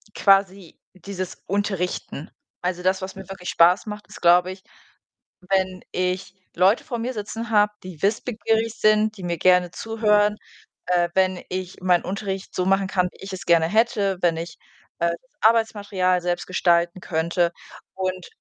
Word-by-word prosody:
quasi 195 Hz, -3 st, +2 dB
dieses 185 Hz, -1 st, -6 dB
Unterrichten. 190 Hz, -5 st, -3 dB, 0.3 s
Also, 180 Hz, 0 st, -2 dB
das, 190 Hz, +1 st, +1 dB
was 190 Hz, 0 st, -6 dB
mir 195 Hz, -1 st, -10 dB
wirklich 185 Hz, -2 st, -7 dB
Spaß 175 Hz, +5 st, +4 dB
macht, 210 Hz, -1 st, -7 dB
ist, -, -, -13 dB
glaube 175 Hz, +1 st, +5 dB
ich, 185 Hz, 0 st, -11 dB, 0.9 s
wenn 190 Hz, -1 st, 0 dB
ich 185 Hz, +1 st, -2 dB, 0.2 s
Leute 190 Hz, +6 st, +3 dB
vor 245 Hz, -6 st, -4 dB
mir 245 Hz, +3 st, -3 dB
sitzen 225 Hz, +1 st, -6 dB
habe, 210 Hz, -1 st, +4 dB
die 185 Hz, -5 st, -10 dB
wissbegierig 225 Hz, +1 st, 0 dB
sind, 215 Hz, 0 st, +3 dB
die 190 Hz, -, -9 dB
mir 170 Hz, -1 st, -2 dB
gerne 180 Hz, +1 st, +4 dB
zuhören, 210 Hz, -2 st, +1 dB, 0.5 s
äh, 175 Hz, -1 st, +2 dB
wenn 185 Hz, -1 st, +1 dB
ich 185 Hz, 0 st, -5 dB
meinen 180 Hz, -1 st, +2 dB
Unterricht 195 Hz, 0 st, -4 dB
so 180 Hz, -, 0 dB
machen 195 Hz, 0 st, +2 dB
kann, 180 Hz, -1 st, +1 dB
wie -, -, -13 dB
ich 200 Hz, -, -7 dB
es 190 Hz, -, -6 dB
gerne 170 Hz, -1 st, +4 dB
hätte, 205 Hz, -1 st, +1 dB
wenn 170 Hz, -2 st, +2 dB
ich, 165 Hz, 0 st, -6 dB, 0.4 s
äh, 170 Hz, 0 st, +2 dB
das 215 Hz, +10 st, -8 dB
Arbeitsmaterial 205 Hz, -5 st, +2 dB
selbst 175 Hz, 0 st, -2 dB
gestalten 175 Hz, -1 st, +1 dB
könnte 170 Hz, 0 st, 0 dB, 0.4 s
und 185 Hz, -1 st, -3 dB
185 Hz, 160 wpm, -23 LUFS, 180-205 Hz, 0.9 s, glaube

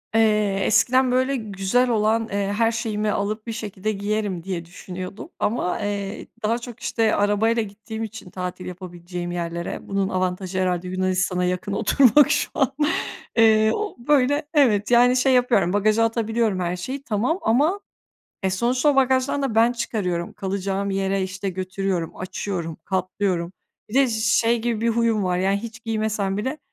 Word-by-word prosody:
Eee, 210 Hz, -3 st, +3 dB
eskiden, 255 Hz, +4 st, +3 dB
böyle, 260 Hz, +2 st, +2 dB
güzel 220 Hz, +2 st, 0 dB
olan, 220 Hz, 0 st, +1 dB
eee, 200 Hz, -1 st, -1 dB
her 230 Hz, 0 st, +3 dB
şeyimi 215 Hz, -2 st, -1 dB
alıp, 215 Hz, +3 st, -2 dB
"Bir -, -, -2 dB
şekilde 215 Hz, -2 st, -3 dB
giyerim." 205 Hz, -3 st, -2 dB
diye 175 Hz, -3 st, -4 dB
düşünüyordum 185 Hz, -, -8 dB
ama, 205 Hz, -5 st, 0 dB
eee, 200 Hz, 0 st, -4 dB, 0.2 s
daha 230 Hz, +2 st, +1 dB
çok, 240 Hz, -1 st, -9 dB
işte, 225 Hz, -2 st, +1 dB
arabayla 215 Hz, +3 st, +2 dB
gittiğim 220 Hz, +2 st, -7 dB
için 215 Hz, -4 st, -8 dB
tatil 180 Hz, 0 st, -5 dB
yapabileceğim 175 Hz, -1 st, -6 dB
yerlere, 170 Hz, 0 st, -4 dB
bunun 195 Hz, -1 st, 0 dB
avantajı 185 Hz, 0 st, -2 dB
herhâlde 180 Hz, -1 st, 0 dB
Yunanistan'a 185 Hz, -1 st, 0 dB
yakın 180 Hz, +2 st, -2 dB
oturmak 275 Hz, +6 st, +5 dB
şu 295 Hz, -, +1 dB
an. 270 Hz, -1 st, +1 dB, 0.7 s
Eee, 220 Hz, -1 st, +5 dB
o, 425 Hz, 0 st, -3 dB
böyle, 290 Hz, +1 st, +3 dB
evet, 235 Hz, -7 st, +3 dB
yani, 245 Hz, +1 st, +6 dB
şey 260 Hz, +1 st, +3 dB
yapıyorum, 230 Hz, -8 st, +3 dB
bagaja 215 Hz, +2 st, +3 dB
atabiliyorum 225 Hz, -3 st, 0 dB
her 175 Hz, 0 st, -1 dB
şeyi 260 Hz, +10 st, -5 dB
tamam 240 Hz, -, 0 dB
ama, 295 Hz, -, +2 dB, 0.6 s
e, 190 Hz, -, +1 dB
sonuçta 245 Hz, +8 st, +1 dB
o 285 Hz, -, +3 dB
bagajdan 260 Hz, +1 st, +2 dB
da 255 Hz, -5 st, -1 dB
ben 230 Hz, +2 st, +4 dB
çıkarıyorum, 190 Hz, -7 st, -2 dB
kalacağım 195 Hz, 0 st, -2 dB
yere, 195 Hz, 0 st, 0 dB
işte, 190 Hz, +1 st, -4 dB
götürüyorum, 185 Hz, -2 st, -3 dB
açıyorum, 180 Hz, -3 st, -4 dB
katlıyorum. 185 Hz, -1 st, -1 dB, 0.4 s
Bir 210 Hz, -, -9 dB
de 270 Hz, -1 st, +4 dB
ş 220 Hz, -1 st, -2 dB
şey 230 Hz, +1 st, +2 dB
gibi 230 Hz, -2 st, -1 dB
bir 235 Hz, -, +1 dB
huyum 230 Hz, -3 st, +1 dB
var, 180 Hz, -1 st, 0 dB
yani, 195 Hz, +2 st, +2 dB
hiç 225 Hz, 0 st, -8 dB
giymesem 215 Hz, -3 st, -1 dB
bile 260 Hz, +9 st, -3 dB
210 Hz, 160 wpm, -23 LUFS, 185-235 Hz, 0.7 s, yani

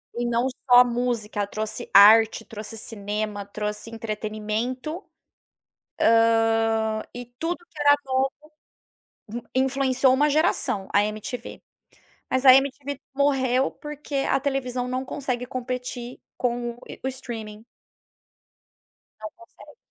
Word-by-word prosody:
e 240 Hz, 0 st, -2 dB
não 240 Hz, +2 st, +1 dB
só 250 Hz, -1 st, +4 dB
a 250 Hz, -, +9 dB
música, 235 Hz, -4 st, -2 dB
trouxe 215 Hz, +1 st, -5 dB
arte, 220 Hz, +2 st, +7 dB
trouxe 220 Hz, +1 st, -8 dB
cinema, 210 Hz, -1 st, -4 dB
trouxe 210 Hz, +2 st, -5 dB
entretenimento, 225 Hz, -, -4 dB, 1.6 s
hã, 220 Hz, -1 st, 0 dB
e 245 Hz, 0 st, -6 dB
tudo 335 Hz, +2 st, -1 dB
que 325 Hz, -3 st, -15 dB
era 290 Hz, 0 st, +6 dB
novo. 265 Hz, 0 st, +1 dB, 1.3 s
Influenciou 265 Hz, 0 st, +2 dB
uma 295 Hz, +3 st, +3 dB
geração, 285 Hz, -, +1 dB
a 205 Hz, -, +5 dB
MTV 215 Hz, +4 st, -6 dB, 0.7 s
mas 260 Hz, +1 st, 0 dB
a 260 Hz, -, +10 dB
MTV 275 Hz, +1 st, 0 dB, 0.2 s
morreu 270 Hz, -2 st, +2 dB
porque 295 Hz, -1 st, -9 dB
a 270 Hz, -, +2 dB
televisão 255 Hz, -3 st, -2 dB
não 255 Hz, +1 st, -2 dB
consegue 255 Hz, -2 st, -3 dB
competir 250 Hz, -1 st, -5 dB, 0.2 s
com 240 Hz, -1 st, -2 dB, 0.3 s
o 265 Hz, -, +1 dB
streaming. 225 Hz, -5 st, -7 dB, 1.6 s
Não 215 Hz, -, -6 dB
consegue, 345 Hz, +6 st, -17 dB
245 Hz, 110 wpm, -24 LUFS, 220-265 Hz, 1.6 s, a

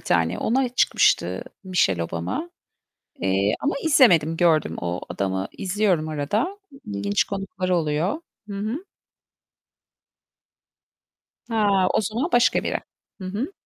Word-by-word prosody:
tane. 85 Hz, +2 st, +1 dB
Ona 255 Hz, +3 st, +1 dB
çıkmıştı 250 Hz, -, +2 dB, 0.2 s
Michelle 135 Hz, -, +1 dB
Obama. 85 Hz, -, -4 dB, 0.7 s
Eee, 95 Hz, +2 st, +2 dB
ama 290 Hz, -, 0 dB
izlemedim, 175 Hz, -, +5 dB
gördüm. 165 Hz, -3 st, +3 dB
O 85 Hz, +1 st, -3 dB
adamı 95 Hz, -1 st, -2 dB
izliyorum 185 Hz, -5 st, 0 dB
arada. 205 Hz, -, -1 dB
İ 275 Hz, -, -14 dB, 0.2 s
ilginç 100 Hz, 0 st, +1 dB
konuklar 195 Hz, -2 st, -4 dB
oluyor. 170 Hz, -, 0 dB, 0.3 s
Hı 200 Hz, -, -5 dB
hı. 225 Hz, -, -3 dB, 2.7 s
Ha, 200 Hz, -4 st, +3 dB
o -, -, +4 dB
zaman 220 Hz, -, -1 dB
başka 240 Hz, 0 st, +4 dB
biri. -, -, -1 dB, 0.4 s
Hı -, -, -6 dB
hı. 225 Hz, -, -3 dB
185 Hz, 115 wpm, -24 LUFS, -, 2.7 s, izlemedim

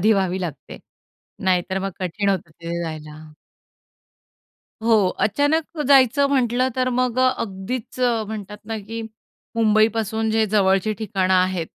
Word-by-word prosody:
आधी 215 Hz, +4 st, +4 dB
व्हावी 190 Hz, -2 st, 0 dB
लागते. 165 Hz, -6 st, -6 dB, 0.7 s
नाहीतर 185 Hz, 0 st, +1 dB
मग 195 Hz, +1 st, -3 dB
कठीण 190 Hz, +3 st, -1 dB
होतं 185 Hz, -4 st, -1 dB
तिथे 170 Hz, +2 st, -5 dB
जायला. 155 Hz, -1 st, -8 dB, 1.5 s
हो. 220 Hz, -4 st, +4 dB
अचानक 295 Hz, -, 0 dB
जायचं 275 Hz, 0 st, +5 dB
म्हटलं 255 Hz, -2 st, +2 dB
तर 255 Hz, 0 st, +1 dB
मग 250 Hz, 0 st, 0 dB
अ, 255 Hz, 0 st, +5 dB
अगदीच 215 Hz, +5 st, -5 dB
म्हणतात 215 Hz, -4 st, -1 dB
ना 225 Hz, 0 st, -3 dB
की 225 Hz, +3 st, -6 dB, 0.6 s
मुंबईपासून 220 Hz, 0 st, +2 dB
जे 220 Hz, 0 st, +2 dB
जवळची 195 Hz, 0 st, +2 dB
ठिकाणं 190 Hz, -3 st, 0 dB
आहेत, 185 Hz, -2 st, +1 dB
210 Hz, 125 wpm, -22 LUFS, 185-230 Hz, 1.5 s, जायचं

